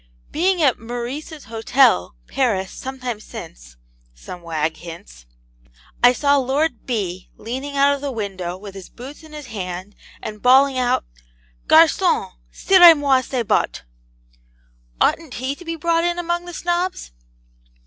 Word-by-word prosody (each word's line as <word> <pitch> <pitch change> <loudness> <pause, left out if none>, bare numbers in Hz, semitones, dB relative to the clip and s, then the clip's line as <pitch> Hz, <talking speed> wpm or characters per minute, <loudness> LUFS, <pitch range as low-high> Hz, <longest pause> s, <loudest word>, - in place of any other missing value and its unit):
'Being 355 +1 +1
at 265 -5 +3
"Meurice's 245 +7 -6
Hotel," 225 - +2
Paris, 200 -8 -1
some 265 0 -7
time 245 -4 -3
since,' - - -11 0.4
some 175 - -10
wag 160 -1 -2
hints, - - -12 0.8
'I 245 0 +7
saw 285 +2 +2
Lord 270 0 -1
B. 190 -7 -3
leaning 265 +5 -5
out 280 +1 +4
of 280 - -5
the 285 -1 -3
window 190 -6 -5
with 200 0 -10
his 195 -2 -11
boots 265 +6 -11
in 315 -1 -15
his 300 -1 -9
hand, 190 -3 -6 0.3
and 210 -1 -8
bawling 260 +1 +5
out 245 - +1 0.6
"GARCON, - - +4 0.2
CIREZ 350 - +7
MOI 275 -3 +3
CES 255 -2 -3
BOTTES." 200 - 0 1.2
Oughtn't 320 -6 +1
he 260 +3 -3
to 320 - -13
be 330 -1 -4
brought 335 +1 +1
in 345 0 0
among 345 0 -2
the 350 - -9
Snobs?' 350 - -2
255 Hz, 145 wpm, -21 LUFS, 195-295 Hz, 1.2 s, I